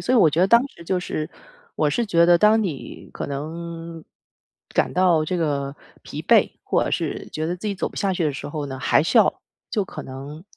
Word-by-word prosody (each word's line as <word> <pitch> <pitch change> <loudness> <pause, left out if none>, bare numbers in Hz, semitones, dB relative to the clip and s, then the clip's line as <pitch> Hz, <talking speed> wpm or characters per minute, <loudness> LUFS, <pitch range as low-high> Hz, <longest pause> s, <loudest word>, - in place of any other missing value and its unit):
所 250 - 0
以 - - +6
我 165 - +6
觉 155 +3 0
得 185 - +5
当 235 +6 +5
时 170 - -15
就 185 +2 0
是 155 -3 -4 0.5
我 150 - +2
是 235 +11 0
觉 170 -5 +4
得 175 0 +7
当 215 +4 +4
你 160 -10 -6
可 - - -5
能 165 +3 -6 0.7
感 - - +2
到 175 -3 +3
这 180 +4 -2
个 140 -4 -1 0.3
疲 - - -7
惫， - - +4
或 - - +2
者 - - -2
是 - - -2
觉 155 0 -2
得 175 +2 -2
自 200 - -7
己 200 - -1
走 190 - -2
不 - - -17
下 200 -3 +1
去 180 -2 -1
的 150 - +1
时 135 - -6
候 145 -1 -4
呢， 135 -1 -6
还 145 - +3
是 160 - +3
要 - - +3 0.3
就 210 -4 0
可 - - -8
能 140 +5 -9
170 Hz, 250 characters per minute, -23 LUFS, 150-185 Hz, 0.7 s, 得